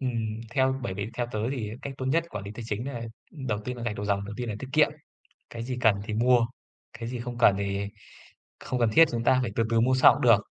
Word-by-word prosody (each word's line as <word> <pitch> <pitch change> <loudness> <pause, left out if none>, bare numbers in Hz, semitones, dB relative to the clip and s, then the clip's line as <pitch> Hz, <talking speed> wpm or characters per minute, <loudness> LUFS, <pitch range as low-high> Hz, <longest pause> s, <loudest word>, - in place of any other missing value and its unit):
ừm, 115 -4 -2
theo 130 +1 +1
bởi 95 -6 -3
vì 100 +3 -4
theo 120 0 -1
tớ 110 - -2
thì 115 -6 -3
cách 140 - -5
tốt 130 - -3
nhất 160 +5 +2
quản 100 -1 -5
lý 100 - -6
tài 120 - -7
chính 110 +2 -3
đấy 140 0 -5
nà 115 -1 -5 0.4
đầu 105 -2 0
tiên 125 +1 -4
nà 120 - -7
gạch 115 -3 -2
đầu 105 - -4
dòng, 100 -1 0
đầu 105 +1 -7
tiên 120 -1 -4
nà 110 - -2
tiết 135 - -6
kiệm, 155 -1 +5 0.6
cái 115 -1 -6
gì 125 +1 -4
cần 110 -3 +5
thì 105 0 -5
mua, 120 +1 +4 0.5
cái 115 -1 -6
gì 125 0 -4
không 120 0 -5
cần 110 -4 +5
thì 100 0 -2 0.7
không 125 - -3
cần 120 -2 +3
thiết 165 - +8
chúng 115 -1 -2
ta 130 +2 +4
phải 120 -4 -2
từ 115 - +2
từ 115 -1 +3
mua 125 +3 +3
sau 130 - +7
cũng - - -5
được. 115 -4 +7
115 Hz, 280 wpm, -27 LUFS, 105-125 Hz, 0.7 s, thiết